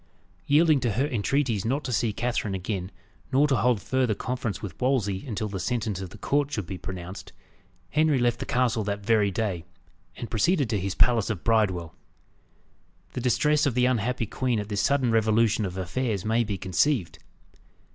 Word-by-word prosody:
Yielding 155 0 +5
to 120 -4 0
her 130 +7 +1
entreaties 120 -3 0
not 135 +6 -1
to 125 - -3
see 115 0 +1
Catherine 110 -3 -2
again, 95 -1 -3 0.4
nor 140 +3 +4
to 135 - +2
hold 120 -2 +2
further 125 +1 0
conference 125 -4 -3
with 95 0 -8
Wolsey 115 -8 +1
until 110 -2 -2
the 100 -2 -5
sentence 110 -4 -2
of 95 - -6
the - - -12
court 145 0 0
should 105 -9 -3
be 90 +1 -6
pronounced, 90 0 -7 0.6
Henry 155 -1 +3
left 120 -1 +1
the - - -5
castle 125 -4 +1
that 100 -1 -3
very 110 -3 +3
day, 95 -4 -2 0.5
and 120 - -7
proceeded 140 - +2
to 105 - +1
his 95 0 -3
palace 120 -4 +3
of 100 -6 -3
Bridewell. 95 -8 +1 1.2
The 125 - -3
distress 150 +4 +2
of 130 - -1
the 125 0 +3
unhappy 125 -1 0
queen 125 +1 -1
at 105 0 -5
this 100 -2 0
sudden 135 -2 +2
revolution 110 0 +2
of 90 0 -7
affairs 100 +2 -2
may 115 +2 +2
be 105 -3 -3
conceived. 95 - 0
115 Hz, 180 wpm, -26 LUFS, 100-130 Hz, 1.2 s, Yielding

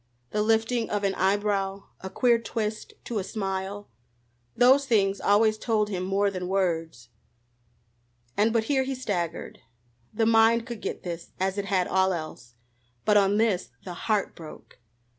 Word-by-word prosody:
The 210 - 0
lifting 225 +2 +1
of 205 -1 -1
an 195 -1 +1
eyebrow, 195 0 0 0.2
a 190 - -7
queer 235 +3 +3
twist 220 -2 -4
to 230 -3 -3
a - - -3
smile 195 0 -4 0.7
those 265 +3 +5
things 200 -5 +2
always 215 +1 +3
told 215 -3 0
him 185 -3 -3
more 195 +2 +1
than 180 -2 -4
words. 165 -10 -1 1.3
And 215 +2 +3
but 230 -1 +2
here 265 +3 +1
he 265 0 -2
staggered. 180 -10 -4 0.5
The 225 +1 0
mind 225 +1 +4
could 235 -3 -7
get - - -5
this, 170 -1 -7
as 190 +2 0
it 200 - -3
had 190 -3 +1
all 190 0 +2
else, 155 -8 -7 0.5
but 210 - +4
on 200 0 +4
this 215 -5 +1
the 180 - -6
heart 210 +3 -1
broke. 160 -6 -12
205 Hz, 160 wpm, -26 LUFS, 190-225 Hz, 1.3 s, those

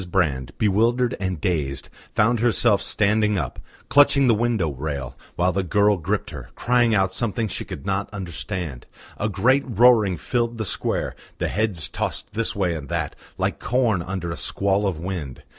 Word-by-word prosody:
Brand, 75 -9 0
bewildered 115 +4 +2
and 95 -3 -2
dazed, 75 -6 -2 0.3
found 115 +2 +3
herself 115 -3 +3
standing 105 0 +2
up, 70 -8 -3 0.3
clutching 140 -1 +5
the 120 - +5
window 110 -7 +1
rail, 70 -2 -4 0.2
while 90 +1 +2
the 95 +2 0
girl 100 +2 +3
gripped 95 +4 -2
her, 70 -6 -8
crying 120 -2 +2
out 95 -1 +2
something 110 +2 -1
she 95 - -3
could 70 - -8
not 100 0 -1
understand. 90 - -5 0.3
A 110 - -1
great 125 +8 +3
roaring 115 -5 +4
filled 120 +4 -1
the 110 - -2
square, 90 - -2 0.2
the - - -1
heads 100 -6 0
tossed - - -4
this 115 +1 -1
way 95 -4 +1
and 75 -4 -6
that, - - -2 0.2
like - - -1
corn 120 -7 +1
under 85 -1 -4
a - - -4
squall 100 +1 0
of 90 -5 -2
wind. 80 -7 -5
100 Hz, 170 wpm, -23 LUFS, 85-115 Hz, 0.3 s, clutching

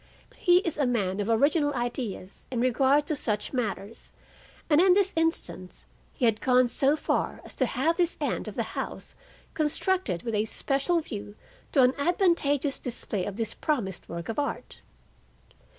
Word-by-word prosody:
He 355 -1 +4
is 325 -3 -1
a 280 - +2
man 200 -6 0
of 205 +2 -1
original 290 +5 +2
ideas 240 -6 -4
in 250 - -2
regard 265 +4 +3
to 305 - -1
such 215 -4 -1
matters, 220 -3 -4 0.6
and 300 +1 +5
in 365 -1 +6
this 395 -1 +3
instance 325 - -1 0.3
had 225 -4 +2
gone 250 -1 +4
so 275 +4 +2
far 310 - -1
as - - -9
to 260 - 0
have 310 +9 0
this 350 -2 +1
end - - -2
of - - -6
the - - 0
house - - -5 0.4
constructed 310 - 0
with 230 - -3
a 210 0 +1
special 275 +9 0
view 205 -7 -7 0.4
to 270 - +5
an 250 +1 +4
advantageous 290 -4 +1
display 225 -6 -4
of 200 - -5
this 225 0 -3
promised 230 - -2
work 170 0 -6
of 225 - -3
art. 285 - -4
260 Hz, 165 wpm, -27 LUFS, 220-305 Hz, 0.6 s, in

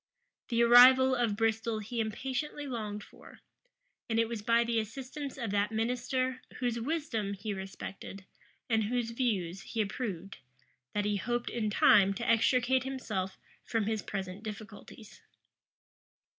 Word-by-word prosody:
The 235 -1 +3
arrival 255 +2 +8
of 240 -4 +1
Bristol 225 +1 0
he 220 +3 -5
impatiently 260 +7 -3
longed 215 -5 -4
for; - - -16 0.7
and 225 - 0
it 230 0 +3
was 230 -2 -4
by 230 +2 +3
the 230 -1 0
assistance 270 +6 -6
of 230 -6 -3
that 205 +1 +1
minister, 255 +3 -1
whose 240 -2 -1
wisdom 230 -7 -2
he 205 +2 -4
respected, 195 0 -8 0.4
and 220 -2 +2
whose 235 +1 -1
views 195 -7 -1
he 225 - -6
approved, 200 -3 -3 0.6
that 205 0 +1
he 205 -1 +1
hoped 240 +4 -2
in 220 -3 -1
time 200 -1 +5
to 235 - -4
extricate 250 +3 +3
himself 215 -8 -4 0.3
from 225 -2 -1
his 220 0 -1
present 190 -1 -5
difficulties. 215 0 -10
225 Hz, 140 wpm, -31 LUFS, 205-245 Hz, 0.7 s, arrival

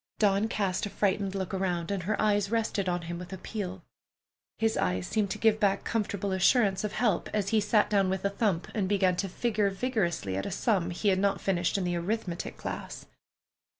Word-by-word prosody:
Dawn 205 0 +3
cast 200 -1 -1
a - - -7
frightened 200 -1 0
look 190 -1 -3
around, 180 -2 -1
and 200 -2 -1
her 205 +5 -1
eyes 205 -2 +2
rested 215 -4 0
on 175 -1 -1
him 170 +1 -5
with 180 +1 -9
appeal. 190 -1 -5 0.7
His 225 0 +1
eyes 90 -1 0
seemed 210 - 0
to - - -3
give 220 -1 +3
back 200 -2 +2
comfortable 205 -3 -1
assurance 190 +1 +3
of 210 - -2
help 215 -6 +1
as 200 -2 0
he 220 0 +3
sat 210 +1 +3
down 195 -2 +2
with 190 +1 -2
a 200 - +2
thump 195 -4 0
and 195 -4 -1
began 190 -3 +3
to 195 - -1
figure 210 +1 0
vigorously 190 - -1
at 95 - -2
a - - -2
sum 190 -2 +1
he 180 +4 0
had 190 -1 +3
not 200 0 +1
finished 180 -1 0
in 195 - -1
the 175 -1 0
arithmetic 180 -1 -3
class. - - -6
195 Hz, 205 wpm, -29 LUFS, 180-210 Hz, 0.7 s, Dawn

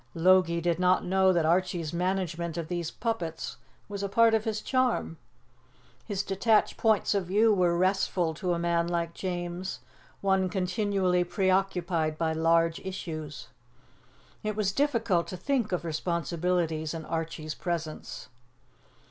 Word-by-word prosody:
Logie 170 0 +4
did 170 0 0
not 180 0 +3
know 190 +1 +4
that 170 -3 +2
Archie's 175 -1 +1
management 175 -2 -1
of 165 -2 -4
these 175 -2 -2
puppets 195 -9 -4 0.3
was 200 -1 -5
a 200 - -2
part 230 +2 +4
of 220 -1 +1
his 220 -1 -1
charm. 255 -10 0 0.9
His 205 -2 -1
detached 210 +3 +2
points 220 -2 +2
of 195 -3 -1
view 215 +4 +4
were 175 -3 +2
restful 185 -2 +1
to 175 +3 -1
a - - -1
man 170 0 +1
like 170 -1 -1
James, 175 0 -4 0.4
one 190 -1 +2
continually 185 -1 +1
preoccupied 180 -4 0
by 160 -1 0
large 165 +1 +2
issues. 155 -9 -6 0.9
It 215 -1 -2
was 205 -2 +1
difficult 230 -9 +1
to 185 - -6
think 240 +1 0
of 180 -1 -2
responsibilities 170 0 -1
in 160 -1 -6
Archie's 160 -1 -4
presence. 165 -2 -5
180 Hz, 140 wpm, -28 LUFS, 165-195 Hz, 0.9 s, Logie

